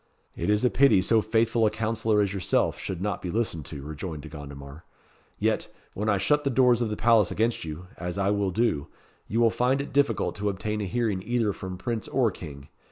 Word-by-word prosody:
"It 85 - -2
is 105 +3 +3
a 125 - +3
pity 135 -7 +5
so 110 +3 +3
faithful 115 +1 +2
a - - +3
councillor 110 0 0
as 100 -1 -2
yourself 95 -3 0
should 95 -1 -4
not 105 -3 -2
be 90 - -4
listened 85 -7 -2
to," 70 -2 -7
rejoined 75 +1 -6
De - - -9
Gondomar. 70 0 -10 0.5
"Yet, - - 0 0.3
when 105 +2 -2
I 100 - +3
shut 150 +10 +2
the 140 - +1
doors 125 -2 +4
of 115 - 0
the 105 - -2
palace 115 -5 +4
against 115 -3 0
you 80 +3 -7
as 90 +2 -4
I 100 0 +1
will 100 -1 +1
do 90 -8 0 0.4
you 115 - -1
will 115 -1 +5
find 125 +4 +1
it 140 - -5
difficult 140 0 +2
to 105 +1 0
obtain 105 +2 -3
a - - -2
hearing 110 -2 -1
either 115 -1 0
from 95 -1 -7
Prince 115 +1 -3
or 125 -5 +2
King. 70 -6 -10
105 Hz, 220 wpm, -26 LUFS, 90-115 Hz, 0.5 s, pity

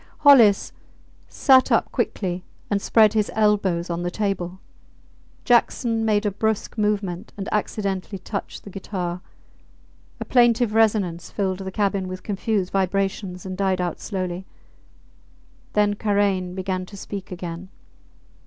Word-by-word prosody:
Hollis 245 -9 +6 0.6
sat 260 -2 +4
up - - +2
quickly, 180 -2 -2 0.3
and 200 -1 +1
spread 215 0 +4
his 215 -2 +1
elbows 200 -5 +2
on 170 0 -3
the 175 - -1
table. 190 -2 -3 0.9
Jackson 235 -2 +2
made 215 -1 +2
a 205 - +1
brusque 220 +2 -1
movement, 205 -4 -1
and 195 - -5
accidentally 200 -2 -2
touched 200 +2 -6
the 200 - -10
guitar. 180 -2 -4 1.0
A - - -4
plaintive 240 -2 +3
resonance 205 -6 +1
filled 190 -2 -2
the 190 -1 -5
cabin 195 -1 0
with 185 0 -7
confused 205 -2 -1
vibrations 195 -1 -1
and 185 -1 -4
died 190 -1 0
out 175 -2 -2
slowly. 185 -2 -4 1.3
Then 205 -1 +3
Karain 200 -3 0
began 185 -1 -3
to 200 - -11
speak 195 0 -7
again. 175 0 -6
195 Hz, 130 wpm, -23 LUFS, 185-210 Hz, 1.3 s, Hollis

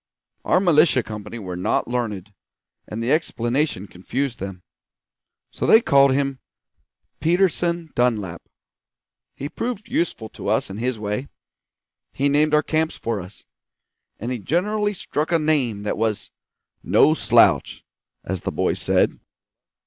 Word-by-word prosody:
Our - - +3
militia 155 -7 +4
company 105 +2 -7
were 90 -5 -6
not 90 - 0
learned, 110 -5 -3 0.5
and 110 +2 -5
the 120 - 0
explanation 130 - 0
confused 120 +8 -4
them; 95 -1 -7 0.9
so - - -3
they 220 - +8
called 140 - +4
him 135 0 0 0.8
Peterson 170 -1 +1
Dunlap. 105 -8 0 0.9
He 140 - -5
proved 230 +5 -4
useful 165 - -1
to - - -8
us - - 0
in 95 - -6
his 125 +1 -1
way; 105 +5 -3 0.9
he 140 +1 +1
named 150 +1 +3
our 150 - +3
camps 160 0 -1
for 115 -4 -3
us, 90 +3 -13 0.7
and 120 +4 -4
he 125 - -3
generally 205 - 0
struck 155 -2 -3
a 170 - +4
name 140 -10 0
that 105 - -2
was 110 -2 -1 0.5
'no - - +4
slouch,' - - +3 0.4
as 95 -1 -4
the - - -3
boys - - -1
said. - - +2
130 Hz, 135 wpm, -22 LUFS, 105-155 Hz, 0.9 s, they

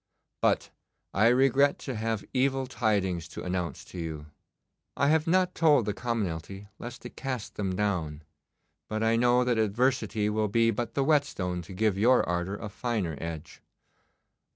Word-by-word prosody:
But - - +1 0.4
I 105 +4 +4
regret 135 +3 +4
to 135 - -4
have 110 -2 -2
evil 135 0 +1
tidings 100 -9 0
to - - -8
announce 90 -1 -3
to 90 - -9
you. 80 -3 -5 0.7
I 140 +1 +3
have 160 +1 +2
not 180 +1 +3
told 150 -8 +4
the 105 - -1
commonalty 100 -5 -3
lest 120 +1 -8
it - - -9
cast 130 -4 -4
them 95 -3 -2
down, 85 -7 -1 0.7
but 110 +1 -1
I 115 +1 +3
know 125 +1 +4
that 120 -2 +1
adversity 110 0 +1
will 105 0 +1
be 115 +2 +3
but 120 +2 -4
the 140 - +2
whetstone 135 - +1
to 85 +3 -10
give 100 0 +1
your 125 +4 +4
ardour 90 +3 -1
a 105 - -6
finer 105 -6 -2
edge. 85 -1 -7
110 Hz, 160 wpm, -28 LUFS, 95-125 Hz, 0.7 s, I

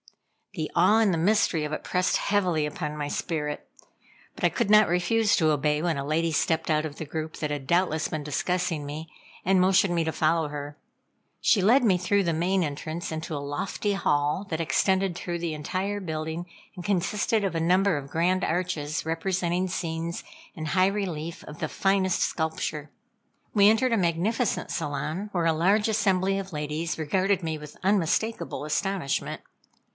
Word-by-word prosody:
The 155 -4 -3
awe 185 +6 +5
and 210 -4 +3
the - - 0
mystery 175 -2 +2
of 150 - -3
it 155 - -4
pressed 180 0 +1
heavily 180 -7 +1
upon 150 0 -4
my 145 -1 -2
spirit, 150 -1 -3 0.7
but - - -10
I - - +5
could - - -1
not 215 0 +6
refuse 205 +5 +2
to 160 -2 +3
obey 150 0 +1
when 170 -1 0
a 140 - -3
lady 160 +3 0
stepped 160 +2 0
out 155 0 +2
of 150 -2 -7
the 160 - -5
group, 155 +1 -5
that 150 -1 -3
had 140 -2 -4
doubtless 170 -2 +2
been 155 -2 -3
discussing 165 +1 -1
me, 155 +3 -6 0.4
and 190 0 +4
motioned 185 0 +4
me 165 - +2
to 160 - -1
follow 160 0 +1
her. 145 0 -6 0.6
She 205 - +3
led 240 +8 +5
me 190 -4 +4
through 200 +3 +2
the 170 -2 0
main 180 +3 +1
entrance 155 +3 -4
into 160 0 -4
a - - -2
lofty 145 +8 -2
hall 150 0 +1
that 160 - -2
extended 185 +5 +1
through 175 0 -4
the 165 -2 -2
entire 185 +7 -3
building, 160 0 -4 0.3
and 180 - -7
consisted 200 +3 0
of 190 - -1
a 165 - 0
number 185 +2 +3
of 140 -1 -5
grand 180 +4 +1
arches 165 -4 -1
representing 175 +2 -1
scenes 165 -1 -3 0.3
in 155 -3 -5
high 185 +4 +3
relief 180 -4 -3
of 150 - -10
the - - -2
finest 195 -1 +1
sculpture. 160 -2 -2 0.6
We 205 -1 +6
entered 230 +3 +3
a - - +3
magnificent 195 +6 0
salon, 155 +8 -3
where 175 -3 0
a 165 - +4
large 195 +7 +3
assembly 195 -3 +1
of 195 0 -7
ladies 150 +2 -3
regarded 185 +4 +1
me 160 -1 -2
with 150 -1 -11
unmistakable 195 -2 0
astonishment. 175 -1 -1
170 Hz, 180 wpm, -26 LUFS, 155-190 Hz, 0.7 s, not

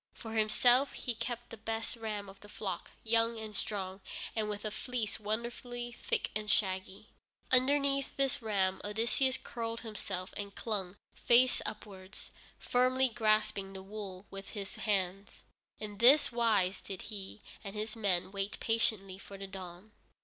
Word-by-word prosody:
For 225 - -8
himself 240 +5 +4
he 245 - -2
kept 240 +1 -4
the 230 - -7
best 225 +2 -3
ram 215 -3 -4
of 195 0 -12
the 205 - -13
flock, 190 -5 -4
young 230 +1 +3
and 215 -1 -6
strong, 195 -2 -3 0.3
and 215 -1 0
with 210 +1 -4
a 215 - -1
fleece 235 -2 -2
wonderfully 240 +3 -3
thick 235 - -2
and 210 0 -2
shaggy. 190 0 +1 0.4
Underneath 275 +1 +3
this 270 -2 +1
ram 190 -4 +1
Odysseus 235 +5 +1
curled 230 -1 -4
himself, 200 -4 -4
and 200 -1 -5
clung, 200 -4 -2 0.2
face 250 +1 +5
upwards, 200 -3 -8 0.3
firmly 255 +1 +3
grasping 215 -4 +2
the 190 0 -7
wool 195 -1 -7
with 195 0 -7
his 200 -1 -4
hands. 195 -1 -1 0.3
In 210 -1 -7
this 275 +5 +8
wise 210 -6 +3
did 190 -2 -6
he 200 +1 -7 0.2
and 200 0 -6
his 215 +1 -2
men 190 -4 +1
wait 195 0 -2
patiently 210 -4 +1
for 195 0 -10
the 195 - -5
dawn. 190 +1 -8
215 Hz, 150 wpm, -33 LUFS, 195-235 Hz, 0.4 s, this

